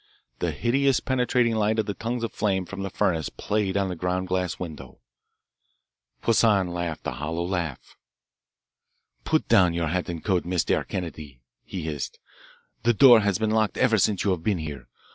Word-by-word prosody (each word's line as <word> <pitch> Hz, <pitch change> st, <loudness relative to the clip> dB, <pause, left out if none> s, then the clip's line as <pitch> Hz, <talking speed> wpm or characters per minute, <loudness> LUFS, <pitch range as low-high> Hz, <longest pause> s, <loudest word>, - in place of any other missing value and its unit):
The -, -, 0 dB
hideous 135 Hz, +2 st, +1 dB
penetrating 125 Hz, -2 st, +1 dB
light 110 Hz, 0 st, +1 dB
of 110 Hz, -, +1 dB
the 100 Hz, -, -3 dB
tongues 115 Hz, +3 st, -3 dB
of 115 Hz, -, -3 dB
flame 95 Hz, -3 st, 0 dB
from 95 Hz, +2 st, -7 dB
the 95 Hz, -, -3 dB
furnace 80 Hz, -3 st, 0 dB
played 100 Hz, -2 st, -1 dB
on 100 Hz, -1 st, +1 dB
the 90 Hz, -, -4 dB
ground 90 Hz, +2 st, -2 dB
glass 90 Hz, -2 st, -1 dB
window. 75 Hz, -7 st, -8 dB, 1.3 s
Poissan 105 Hz, -5 st, +3 dB
laughed 85 Hz, -2 st, -4 dB
a -, -, -1 dB
hollow 80 Hz, +3 st, -3 dB
laugh. 85 Hz, -6 st, -4 dB, 1.3 s
"Put 155 Hz, -1 st, +1 dB
down 90 Hz, -7 st, +4 dB
your 85 Hz, -2 st, -1 dB
hat 90 Hz, +2 st, -2 dB
and 85 Hz, -2 st, -6 dB
coat, 95 Hz, -4 st, +1 dB
Mistair 90 Hz, -1 st, 0 dB
Kennedy," 75 Hz, -8 st, -6 dB, 0.2 s
he 90 Hz, -, -6 dB
hissed. 75 Hz, -4 st, -4 dB, 0.6 s
"The 120 Hz, 0 st, +2 dB
door 120 Hz, -1 st, +8 dB
has 100 Hz, -3 st, +1 dB
been 110 Hz, 0 st, 0 dB
locked 110 Hz, -1 st, +1 dB
ever 115 Hz, -4 st, +3 dB
since 100 Hz, 0 st, +2 dB
you 100 Hz, -, +2 dB
have 90 Hz, -3 st, -1 dB
been 100 Hz, +2 st, 0 dB
here. 75 Hz, -3 st, -7 dB
95 Hz, 175 wpm, -25 LUFS, 85-110 Hz, 1.3 s, door